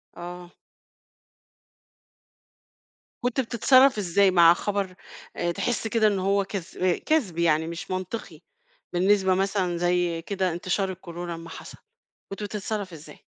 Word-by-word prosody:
آه. 175 0 -8 2.7
كنت 245 +1 0
بتتصرّف 255 +2 +4
إزاي 195 0 +3
مع 170 -2 +7
خبر 195 0 -3 0.4
آآ، 175 0 -1
تحس 225 +5 -2
كده 220 0 +3
إن 200 -2 +1
هو 195 +1 +2
كذ 185 -2 -2
كذب 250 - 0
يعني 160 -1 +2
مش 170 +2 -6
منطقي، 185 +4 -5 0.5
بالنسبة 190 +1 +3
مثلًا 190 -2 0
زي 175 -1 0
كده 190 0 -1
انتشار 185 +3 -1
الكورونا 175 -1 -7
لمّا 165 0 -9
حصَل، - - -10 0.5
كنت 195 +1 -6
بتتصرّف 205 -2 -4
إزاي؟ 155 -1 -12
185 Hz, 120 wpm, -25 LUFS, 175-205 Hz, 2.7 s, مع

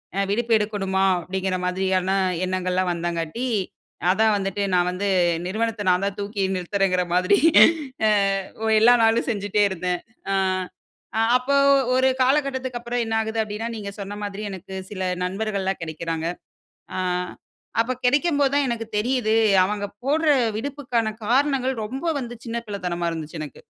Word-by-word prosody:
அ, - - -3
விடுப்பு 230 +2 +1
எடுக்கணுமா? 195 -2 -1 0.2
அப்டிங்கிற 185 +1 -2
மாதிரியான 185 0 0 0.4
எண்ணங்கள்லாம் 185 0 0
வந்தங்காட்டி, 170 +7 -3 0.6
அதான் 220 +2 +3
வந்துட்டு, 195 +1 -2
நான் 180 0 +3
வந்து 200 +3 -2 0.4
நிறுவனத்த 220 +2 -2
நான்தா, 195 +3 +1
தூக்கி 200 0 -3
நிறுத்துறேங்கிற 185 0 0
மாதிரி 185 +3 +4 0.7
அ - - +4 0.5
ஓ - - 0
எல்லா 240 +2 +7
நாளும் 225 +1 +3
செஞ்சுட்டே 205 -1 0
இருந்தே. 180 -1 -2 0.4
அ, - - +1 1.0
அப்ப 250 +2 -11 0.5
ஒரு 260 0 +4
காலகட்டத்துக்கு 260 -2 +1
அப்புறம் 240 0 -2
என்னாகுது 225 0 -1
அப்டின்னா, 215 +2 -5
நீங்க 200 -1 -6
சொன்ன 200 +1 -6
மாதிரி, 205 0 -5
எனக்கு 190 0 -9 0.2
சில 190 -2 -5 0.2
நண்பர்கள்லாம் 195 -1 -2
கிடைக்கிறாங்க. 165 0 -3 0.7
அ, - - -3 0.8
அப்ப 235 +3 0
கெடைக்கம்போதுதா 285 +1 +2
எனக்கு 230 -1 -3
தெரியுது, 235 -1 +1 0.3
அவங்க 205 +1 -2 0.2
போடுற 305 +3 +2 0.3
விடுப்புக்கான 250 -4 -2 0.2
காரணங்கள், 265 +1 +2
ரொம்ப 265 +8 -6 0.2
வந்து 240 -1 -6
சின்ன 230 0 -3
பிள்ளைத்தனமா 180 -4 -3
இருந்துச்சு, 160 0 -6
எனக்கு. 145 -4 -9
205 Hz, 130 wpm, -23 LUFS, 185-240 Hz, 1.0 s, எல்லா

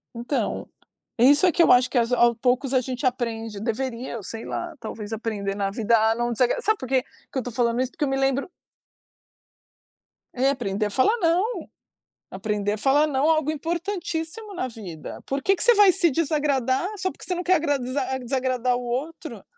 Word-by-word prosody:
Então, 240 +4 -2 0.5
isso 285 +8 +5
é 360 - +5
que 335 - +4
eu - - +5
acho 250 0 +5
que - - -1
as 235 0 +2
ao 240 -1 +4
poucos, 250 +3 0
a 260 - +4
gente 255 +2 -4
aprende. 225 -4 -2
Deveria 235 +2 -3
ou 215 - -9
sei 225 +4 -7
lá. 345 -2 -5
Talvez 220 -1 -7
aprender 205 -3 -3
na 200 -1 -1
vida 225 +2 +2
a 220 +1 +3
não 240 +1 -1
desagra 245 - +1
sabe 435 -1 +2
por 260 - -6
que 260 0 +2
que - - -12
eu - - -4
tô 245 - -5
falando 235 +1 +1
isso? 260 0 -2
Porque - - -4
eu 285 - +1
me 270 - 0
lembro 270 +4 0 1.8
É, 260 +2 +2
aprender 215 -6 -1
a - - -1
falar 265 - +2
"não". 365 +6 +1 0.7
Aprender 205 +1 -2
a - - -3
falar 280 +6 +3
"não" 275 -1 0
é - - +4
algo 310 -1 +1
importantíssimo 340 +4 -4
na 355 -8 -3
vida. 195 -10 -9
Por 275 +1 -2
que 390 +6 +3
que 345 - 0
você 480 - +7
vai 410 -3 +6
se 345 -3 +4
desagradar 285 -2 0
só 375 0 -1
porque - - -10
você 365 - -1
não 355 - -3
quer 370 +1 +4
agrada 290 -5 0 0.4
desagradar 255 -1 0
o 245 - -3
outro? 265 +7 -5
260 Hz, 200 wpm, -24 LUFS, 230-315 Hz, 1.8 s, você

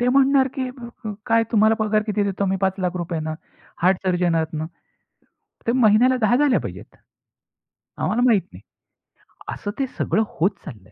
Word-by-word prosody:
ते 245 - +2
म्हणणार, 270 +1 +4
की 260 -3 -2
"प 255 0 -15 0.2
प 215 - -3
काय 230 -1 +3
तुम्हाला 220 0 +5
पगार 215 -1 +1
किती 210 -1 0
देतो 200 0 -1
आम्ही? 190 0 0
₹500,000 180 -3 -1
ना. 155 0 -3 0.5
हार्ट 185 +2 +4
सर्जन 180 -2 +1
आहात 160 -1 -1
ना. 155 +1 -3 1.0
तर - - +4
महिन्याला 245 +1 +5
10 220 +2 +4
झाल्या 280 0 +3
पाहिजेत. - - -9 1.0
आम्हाला 230 +3 0
माहीत 225 -6 +4
नाही." - - -12 0.9
असं 205 - -5
ते 270 - 0
सगळं 220 - +1 0.2
होत 180 +5 +4 0.2
चाललंय. 110 - -11
210 Hz, 165 wpm, -22 LUFS, 180-245 Hz, 1.0 s, तुम्हाला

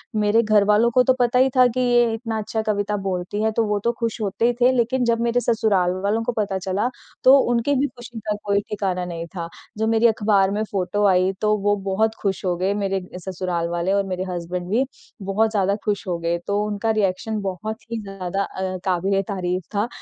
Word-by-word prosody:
मेरे 210 +1 +3
घरवालों 210 +1 +4
को 250 +2 +4
तो 260 - +4
पता 245 0 +3
ही 265 +1 +5
था 255 -1 +7
कि 245 +1 -3
ये 240 -2 +3
इतना 225 -1 -3
अच्छा 220 +1 -2
कविता 210 -1 -1
बोलती 185 +2 -2
है 220 - +2
तो 225 +1 +1
वो 210 -1 0
तो 235 - +2
खुश 230 0 -2
होते 205 +2 0
ही 245 - +2
थे। 250 - +6
लेकिन 250 +1 +1
जब 230 -1 +2
मेरे 235 +1 +2
ससुराल 205 -7 +2
वालों 210 +3 +1
को 245 - -1
पता 200 -2 0
चला 190 +5 -1 0.3
तो 265 +2 +8
उनकी 240 +4 +1
भी 275 +2 +2
खुशी 240 -1 -9
का 210 - +1
कोई 200 -1 +2
ठिकाना 190 -4 -2
नहीं 170 -1 -5
था। 170 -1 -4 0.3
जो 220 +1 0
मेरी 225 +1 +4
अखबार 205 -3 +2
में 210 +2 -1
फ़ोटो 200 +1 0
आई 185 0 +3
तो 215 0 +3
वो 205 0 +3
बहुत 220 +3 +1
खुश 195 -2 -1
हो 180 -1 +1
गए 190 +3 0
मेरे 195 -2 -1 0.2
ससुराल 180 -2 -3
वाले 175 +2 0
और 200 0 +2
मेरे 185 -1 -3
हसबैंड 175 0 -4
भी 245 +7 +2 0.4
बहुत 205 +3 +1
ज़्यादा 200 -2 +1
खुश 205 -2 -1
हो 175 -2 -1
गए। 170 +1 0
तो 205 +1 +1
उनका 210 +1 -1
रिएक्शन 215 +1 -1
बहुत 200 +3 -4
ही 230 -1 -2
ज़्यादा 195 -1 -3
अ, 190 -1 -4
क़ाबिल-ए-तारीफ़ 185 0 -1
था। 205 +3 +1
205 Hz, 215 wpm, -22 LUFS, 190-225 Hz, 0.4 s, तो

